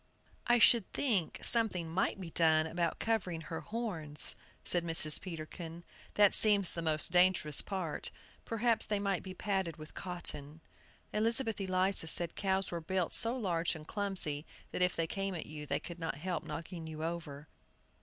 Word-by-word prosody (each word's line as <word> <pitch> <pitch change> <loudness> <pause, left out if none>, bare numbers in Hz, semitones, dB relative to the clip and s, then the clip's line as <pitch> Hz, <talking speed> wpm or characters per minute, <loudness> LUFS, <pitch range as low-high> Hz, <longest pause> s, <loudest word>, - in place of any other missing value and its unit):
"I 240 0 +4
should 230 -3 +5
think 210 - 0
something 210 -8 +5
might 175 +4 -1
be 175 -3 -8
done 160 -1 +4
about 170 0 -2
covering 190 -7 -2
her 165 +1 -6
horns," 175 -11 -1 0.3
said 175 -1 +1
Mrs. 165 -2 +5
Peterkin; 165 -1 -8 0.3
"that 205 -1 +5
seems 205 -4 +4
the 170 - -5
most 155 -2 +1
dangerous 180 -5 +4
part. 185 -6 -4 0.3
Perhaps 230 0 +1
they 210 - 0
might 200 -2 -1
be 185 -1 -9
padded 190 -5 -2
with 155 0 -11
cotton." 160 -4 -5 0.5
Elizabeth 225 0 +1
Eliza 185 -2 +2
said 170 +1 +4
cows 195 -1 -1
were 170 -1 -4
built 185 +1 -2
so 230 +3 +3
large 175 -8 -1
and 155 -1 -11
clumsy, 190 -8 -2 0.3
that - - -4
if 180 0 +2
they 165 - -1
came 195 +2 -4
at 165 - -5
you 150 -1 -9
they - - -1
could 170 -1 -10
not 165 -3 -3
help 175 +1 -4
knocking 165 0 -7
you 155 0 -7
over. 155 -3 -6
175 Hz, 165 wpm, -32 LUFS, 160-195 Hz, 0.5 s, should